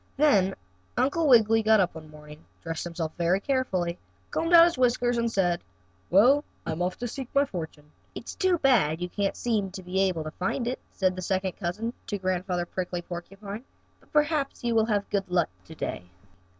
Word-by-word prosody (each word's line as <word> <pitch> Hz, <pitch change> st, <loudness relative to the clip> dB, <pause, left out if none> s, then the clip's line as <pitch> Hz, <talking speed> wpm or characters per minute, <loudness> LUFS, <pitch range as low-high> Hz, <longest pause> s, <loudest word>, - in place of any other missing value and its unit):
Then 200 Hz, -11 st, +4 dB, 0.4 s
Uncle 280 Hz, +6 st, +2 dB
Wiggily 225 Hz, -3 st, +6 dB
got 220 Hz, 0 st, +5 dB
up 185 Hz, -2 st, +2 dB
one 155 Hz, -1 st, -10 dB
morning, 150 Hz, 0 st, -13 dB, 0.2 s
dressed 165 Hz, 0 st, -4 dB
himself 165 Hz, -2 st, -4 dB
very 175 Hz, +3 st, +2 dB
carefully, 195 Hz, -9 st, -1 dB, 0.3 s
combed 330 Hz, +1 st, -1 dB
out 335 Hz, -1 st, +10 dB
his 340 Hz, -, +1 dB
whiskers, 245 Hz, -1 st, +2 dB
and 235 Hz, 0 st, 0 dB
said: 175 Hz, -5 st, +1 dB, 0.5 s
"Well, 255 Hz, +10 st, +5 dB, 0.2 s
I'm 160 Hz, +2 st, -3 dB
off 180 Hz, +1 st, 0 dB
again -, -, -35 dB
to 230 Hz, -, -7 dB
seek 270 Hz, -2 st, -7 dB
my 280 Hz, +1 st, +5 dB
fortune." 160 Hz, -, -7 dB, 0.2 s
"It's -, -, -7 dB
too 375 Hz, -2 st, +2 dB
bad 225 Hz, -, +3 dB
you 180 Hz, 0 st, -3 dB
can't 200 Hz, +1 st, -1 dB
seem 210 Hz, -5 st, -1 dB
able 185 Hz, -2 st, 0 dB
to 155 Hz, -, -6 dB
find 195 Hz, -, -2 dB
it," 255 Hz, -, -2 dB
said 185 Hz, -2 st, 0 dB
the 185 Hz, -, -5 dB
second 190 Hz, +1 st, -1 dB
cousin 210 Hz, +6 st, -4 dB
to 205 Hz, -, -2 dB
Grandfather 185 Hz, -1 st, -1 dB
Prickly 180 Hz, -1 st, -4 dB
Porcupine, 195 Hz, +5 st, -7 dB, 0.4 s
"but -, -, -27 dB
perhaps 295 Hz, -3 st, +1 dB
you 235 Hz, -1 st, +1 dB
will 220 Hz, -1 st, +4 dB
have 205 Hz, -3 st, 0 dB
good 195 Hz, -2 st, -1 dB
luck 175 Hz, -2 st, +2 dB, 0.2 s
to 160 Hz, -, -11 dB
day. 90 Hz, -, -4 dB
195 Hz, 190 wpm, -27 LUFS, 175-245 Hz, 0.5 s, out